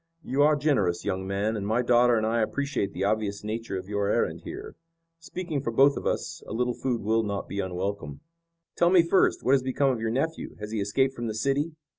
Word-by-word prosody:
"You 135 +1 0
are 150 +1 +5
generous, 130 - +1
young 95 0 -2
man, 100 +3 -1
and 100 -2 -3
my 115 +3 +1
daughter 120 0 +4
and 110 -1 +1
I 115 +1 +1
appreciate 135 -3 -1
the 95 - -3
obvious 100 0 -1
nature 110 -1 -4
of 95 0 -7
your 100 -1 -1
errand - - 0
here. - - -8 0.4
Speaking 165 -3 -4
for 130 - -2
both 135 +4 +5
of - - -3
us, 165 0 -2
a - - -6
little 125 +2 0
food 120 -3 -2
will 110 +2 +2
not 100 -2 -3
be 100 - -5
unwelcome." 95 -5 -4 0.5
"Tell 170 - +4
me 180 -2 +6
first, 170 +3 +2
what 130 - +2
has 135 -1 +5
become 130 +1 +1
of 120 -3 -3
your 115 - 0
nephew. 150 +8 -2
Has 105 0 -6
he 110 -2 -1
escaped 130 +7 +1
from 120 -3 -4
the 110 - -3
city?" 140 +7 0
115 Hz, 225 wpm, -27 LUFS, 100-140 Hz, 0.5 s, me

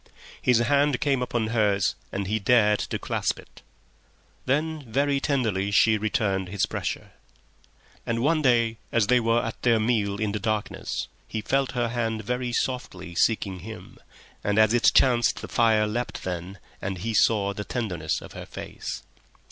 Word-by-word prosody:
His 125 -2 +4
hand 140 +3 +2
came 140 -3 +1
upon 120 -3 -1
hers 105 -4 +2 0.2
and 100 0 -3
he 105 +3 0
dared 105 -1 +4
to - - -3
clasp - - -1
it. - - -15 0.9
Then 155 +3 0
very 140 +3 +2
tenderly 110 -9 0
she 110 +2 +4
returned 100 -4 0
his 100 0 0
pressure. - - -4 0.9
And 115 0 -1
one 155 +2 +3
day, 115 -4 +3
as 115 -3 +3
they 125 +4 +4
were 115 0 +2
at 115 - -6
their 115 -2 +3
meal 105 -3 0
in 105 -2 0
the 105 - -2
darkness, 110 0 -2 0.2
he 110 - -3
felt 135 +3 0
her 120 -2 0
hand 115 -2 -2
very 125 +3 -2
softly 95 -8 -3
seeking 95 0 +1
him, 110 +5 -10 0.4
and 105 0 0
as 110 0 +5
it 120 - +5
chanced 120 -3 +4
the - - -6
fire 110 -2 +3
leapt 120 +3 -3
then, 90 +2 -5 0.2
and 95 0 -3
he 110 +6 -3
saw 100 -2 +3
the 105 - -5
tenderness 90 -10 -2
of - - -11
her - - -8
face. - - -7
110 Hz, 165 wpm, -26 LUFS, 100-125 Hz, 0.9 s, as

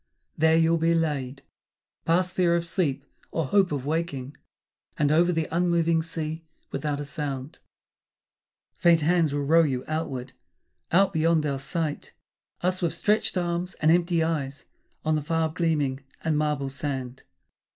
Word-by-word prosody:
There 160 +1 +4
you'll 165 0 +3
be 165 +1 +3
laid, 145 -5 -2 0.6
past 180 +2 +2
fear 175 -2 +3
of 170 0 0
sleep 150 -6 -1 0.2
or 165 - -1
hope 190 +5 +3
of 140 -3 -3
waking; 145 -3 -3 0.6
And 145 -1 +2
over 170 +3 +4
the 160 -2 -1
unmoving 170 -1 +2
sea, 160 0 -4 0.3
without 150 -2 -2
a 145 - -4
sound, 140 -1 -5 1.2
Faint 170 -2 +4
hands 165 -1 +2
will 145 0 -1
row 165 +4 +5
you 135 -5 0
outward, 135 -5 -3 0.6
out 195 +3 +4
beyond 160 -1 +2
our 140 -2 -1
sight, 150 +2 -3 0.5
Us 185 +1 0
with 170 -2 0
stretched 210 -2 +1
arms 175 +1 -2
and 155 +1 +3
empty 170 -1 +2
eyes 145 -4 -3 0.4
on 155 - +2
the 155 - 0
far 165 +1 0
gleaming 155 -5 0 0.2
And 160 -1 +1
marble 150 -2 0
sand. 135 -2 -4
160 Hz, 150 wpm, -26 LUFS, 145-170 Hz, 1.2 s, row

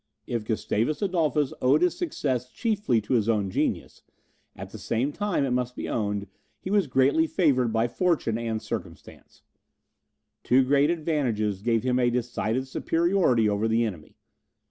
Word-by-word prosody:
If 115 -3 -3
Gustavus 110 - -1
Adolphus 155 -7 +1
owed 140 +6 +4
his 180 - +2
success 130 - -2
chiefly 205 - 0
to 105 - -3
his 115 -2 +2
own 105 -4 0
genius, - - -2 0.5
at - - -9
the - - -9
same 125 +6 -1
time, 205 -9 0
it 130 - -2
must 125 0 -1
be - - -5
owned, 105 -2 -2 0.3
he 190 - -6
was 200 -5 +2
greatly 140 +5 +3
favoured 135 - +2
by 115 +1 +1
fortune 160 -4 0
and 115 -1 -2
by - - -19
circumstances. - - -8 1.0
Two 130 +2 +4
great 140 +3 +3
advantages 130 - -1
gave 115 0 +1
him 125 0 +1
a 120 -1 +3
decided 125 +1 -2
superiority 165 - +1
over 105 +1 0
the 115 +1 +2
enemy. 90 -9 -7
125 Hz, 160 wpm, -26 LUFS, 115-155 Hz, 1.0 s, owed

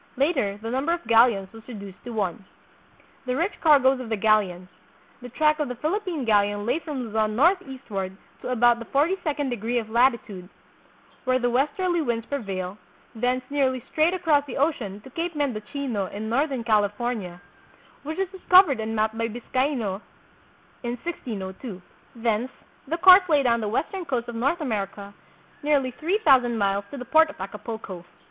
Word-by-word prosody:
Later 265 - +1
the 225 - -3
num 265 +4 -1
ber 335 - +3
of 345 - -4
galleons 225 -4 +4
was 225 - -11
reduced 200 -6 -9
to - - -6
one. 210 -2 -3 0.8
The 250 - 0
Rich 345 +8 -2
Cargoes 270 -4 +5
of 250 -3 -7
the 220 - -1
Galleons. 200 -4 +2 0.5
The 245 - -8
track 305 +4 +2
of 300 - 0
the 250 - -5
Philippine 335 - -2
galleon 205 -1 +2
lay 250 +7 +1
from 300 -5 -5
Luzon 215 -1 -1
northeastward 260 - 0 0.2
to - - -6
about 240 -1 +4
the 230 - -7
forty 295 +10 +2
second 290 -3 -1
degree 235 +1 -2
of 220 -2 -3
latitude, 230 -7 +1 0.8
where 255 0 +3
the 245 -1 0
westerly 335 +7 +1
winds 235 -5 -2
prevail, 195 -8 -4 0.3
thence 250 +2 0
nearly 260 -4 +1
straight 325 +3 +2
across 320 -5 +2
the 255 - -6
ocean 245 -9 -1
to 265 - -14
Cape 335 +4 -3
Mendocino 250 -5 -2
in 215 +3 -6
northern 265 0 0
California, 210 -3 0 0.6
which 310 +2 -6
was 385 0 0
dis 380 -2 -12
covered 360 - +7
and 220 0 -3
mapped 220 +1 0
by 230 0 -1
Biscaino 240 -3 -2 0.8
in 240 0 -3
1602. 205 - -6 0.4
Thence 230 +1 0 0.4
the 330 +4 -1
course 370 +1 +8
lay 295 -3 +4
down 235 -2 +2
the 215 - -2
western 330 - -2
coast 250 -5 -2
of 240 - -6
North 275 +9 0
America 200 -5 -4 0.5
nearly 285 -3 +1
three 355 +6 +1
thousand 250 -5 +5
miles 200 -1 0
to 285 - -8
the 250 - -7
port 315 +5 +5
of 300 - -11
Acapulco. 205 -2 -7
245 Hz, 170 wpm, -25 LUFS, 215-290 Hz, 0.8 s, course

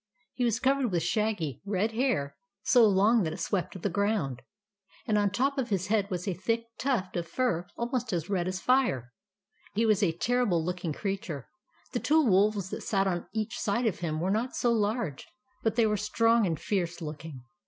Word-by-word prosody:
He 250 - -2
was 230 -2 +1
cov 270 +1 +3
ered 260 -4 0
with 175 -4 0
shaggy, 210 - -1
red 205 +2 0
hair, 220 - 0 0.3
so 240 -3 +6
long 210 +4 +4
that 160 -4 -1
it - - -7
swept 190 -1 -2
the 190 - -1
ground, 200 - 0 0.6
and 215 - +1
on 205 -1 +3
the 195 - -3
top 275 +2 +1
of 250 -2 -1
his 190 -2 -1
head 205 -2 +2
was 180 -1 -3
a 190 - +1
thick 230 +6 -1 0.2
tuft 245 -9 -1
of 170 -1 -2
fur 180 -3 0
almost 240 -1 -2
as 170 -3 -1
red 185 -3 0
as 185 0 -2
fire. 190 - +1 0.6
He 225 +2 +2
was 215 -2 +3
a 190 -5 +3
terrible 215 -8 +1
looking 180 -2 -2
creature. 180 - -4 0.4
The 245 - -1
two 310 +3 +3
wolves 200 -2 +2
that - - -4
sat 195 -2 +1
on 175 -3 -1
each 215 0 -3
side 225 +4 0
of 215 -5 0
him 155 -3 -2
were 180 +4 0
not 230 +5 -1
so 240 - +2
large; 210 - -1 0.3
but 225 -2 0
they 230 -2 +4
were 210 -1 +1
strong 225 +1 +3
and 165 -3 -2
fierce 175 -4 -1
looking. 150 -4 -7
205 Hz, 205 wpm, -29 LUFS, 175-230 Hz, 0.6 s, so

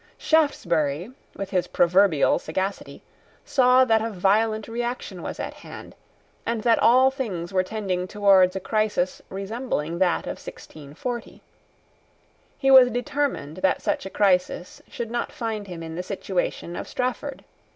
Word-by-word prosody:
Shaftesbury, 175 - +1 0.2
with 195 -1 -6
his 180 -2 0
proverbial 175 -3 +3
sagacity, 190 +5 -4 0.4
saw 255 -1 +4
that 225 -3 +3
a 225 - -2
violent 215 +2 +1
reaction 235 -5 -4
was - - -6
at - - -4
hand, - - -11 0.5
and 230 -2 -2
that 230 -2 +4
all 260 +3 +5
things 195 -10 -4
were 185 - +3
tending 185 -2 -3
towards 195 -2 +4
a - - -1
crisis 210 -2 -1
resembling 195 - -3
that 180 -3 +2
of - - -6
1640. 160 - -8 1.1
He 270 -1 +2
was 260 -2 +9
determined 245 - -2
that 185 0 +1
such - - -1
a - - -7
crisis 185 -2 0
should 230 -1 -5
not 240 0 -2
find 220 -3 -4
him 175 -3 -7
in 160 0 -7
the 175 - -3
situation 185 -2 -3
of - - -6
Strafford. 255 +3 -3
200 Hz, 140 wpm, -24 LUFS, 180-240 Hz, 1.1 s, was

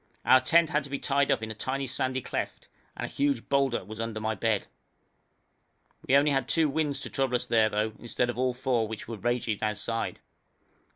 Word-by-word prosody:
Our 130 - +7
tent 165 +4 +4
had 150 0 +1
to - - -10
be 140 - -2
tied 140 0 +1
up - - +2
in 110 - -4
a - - -4
tiny 135 +5 -2
sandy 130 0 -1
cleft, - - -4 0.3
and - - -3
a - - -4
huge 140 -4 -1
boulder 135 -3 +1
was 110 +1 -7
under 115 -1 -3
my 110 0 -1
bed. 105 0 0 1.4
We 135 - +4
had 140 +1 +5
only 135 -3 +2
two 160 +2 +2
winds 145 -1 -1
to - - -5
trouble 135 -2 0
us 125 - 0
there, 110 -2 +3
though, 105 +1 -1
instead 120 +1 -1
of - - -10
all 130 -1 +1
four, 125 -3 0
which 110 0 -7
were 115 -1 -5
raging 120 -1 -1
outside. 110 +1 -2
125 Hz, 210 wpm, -28 LUFS, 110-140 Hz, 1.4 s, Our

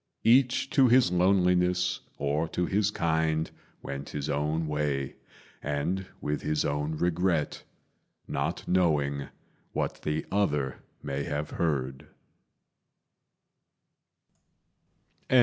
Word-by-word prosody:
Each 125 +3 +4
to 135 -4 +5
his 125 -6 +5
loneliness 90 -1 +3 0.2
or 75 +3 0
to 90 - -1
his 100 +3 +2
kind, 80 -4 0 0.3
Went 70 0 -5
his 75 0 -3
own 75 +3 0
way, 75 -3 -1 0.4
and 85 +7 -1
with 75 0 -2
his 75 0 0
own 75 +2 -1
regret, 85 -1 0 0.7
Not - - -2
knowing 75 -6 +2 0.5
what - - -2
the 75 +1 -2
other 75 -10 0 0.2
may 70 0 -2
have 75 +1 -3
heard. 65 -5 -1
80 Hz, 95 wpm, -28 LUFS, 75-90 Hz, 0.7 s, to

